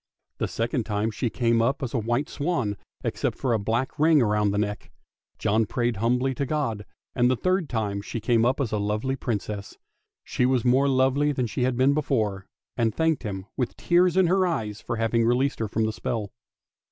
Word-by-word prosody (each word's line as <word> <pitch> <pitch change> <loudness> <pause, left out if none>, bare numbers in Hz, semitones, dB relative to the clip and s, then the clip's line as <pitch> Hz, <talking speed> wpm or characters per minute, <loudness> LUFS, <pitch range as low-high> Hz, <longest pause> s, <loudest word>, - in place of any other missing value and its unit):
The - - 0
second 115 +1 -1
time 105 +1 0
she 115 +3 -2
came 115 -1 +1
up 135 +5 0
as 125 - -3
a 125 - +1
white 120 +7 -1
swan, 140 -10 -1 0.3
except - - -2
for 130 -3 0
a 110 - +1
black 115 +8 -2
ring 155 0 +5
round 105 -1 +2
the 100 - -1
neck. 105 0 -2 0.5
John 110 +1 +1
prayed 120 -1 -1
humbly 125 +5 +1
to 140 - -2
God, 115 -9 -2 0.3
and 120 0 +3
the 130 - +3
third 185 - 0
time 105 -4 -2
she 115 - -5
came 115 +1 +2
up 125 +4 +2
as 130 -5 -1
a 105 - 0
lovely 105 +6 -1
Princess. 105 -5 -4 0.5
She - - -1
was 130 -2 +1
more 130 +3 +4
lovely 135 +2 +2
than 125 -2 -1
she 125 +2 -1
had 125 -1 0
been 130 +2 +4
before, 110 -10 -1 0.3
and 115 -3 0
thanked 160 -3 +1
him, 95 -4 -5
with 125 - -2
tears 180 +1 +3
in 190 - +5
her 185 +2 +3
eyes, 110 - -3
for 120 - -3
having 115 +1 +1
released 125 +4 +1
her 110 - -1
from 110 +2 0
the 110 - -1
spell. 105 -3 -3
120 Hz, 205 wpm, -25 LUFS, 110-135 Hz, 0.5 s, ring